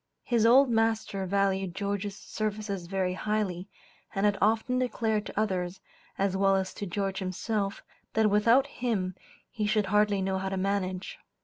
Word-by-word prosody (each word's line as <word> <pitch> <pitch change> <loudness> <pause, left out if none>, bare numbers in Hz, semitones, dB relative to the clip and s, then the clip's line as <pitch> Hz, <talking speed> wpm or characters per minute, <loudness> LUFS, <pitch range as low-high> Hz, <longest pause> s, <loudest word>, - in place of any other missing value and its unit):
His 230 -2 +3
old 265 +4 +7
master 225 -4 0
valued 195 -2 0
George's 200 0 -3
services 210 -4 -4
very 185 -1 -1
highly, 195 -2 -2 0.5
and 195 +1 +1
had 205 -1 +3
often 225 +4 +2
declared 225 -4 0
to - - -4
others, 185 -3 -1 0.4
as 195 -1 +1
well 195 0 +3
as 190 -1 -1
to 205 - -5
George 195 +1 -2
himself, 195 +2 -2 0.3
that 220 -1 +3
without 230 +6 +5
him 225 -9 -2 0.4
he 215 -3 -2
should 215 -1 +2
hardly 210 -1 +3
know 190 0 0
how 190 0 -2
to 195 - -3
manage. 190 -1 -2
200 Hz, 155 wpm, -29 LUFS, 190-215 Hz, 0.5 s, old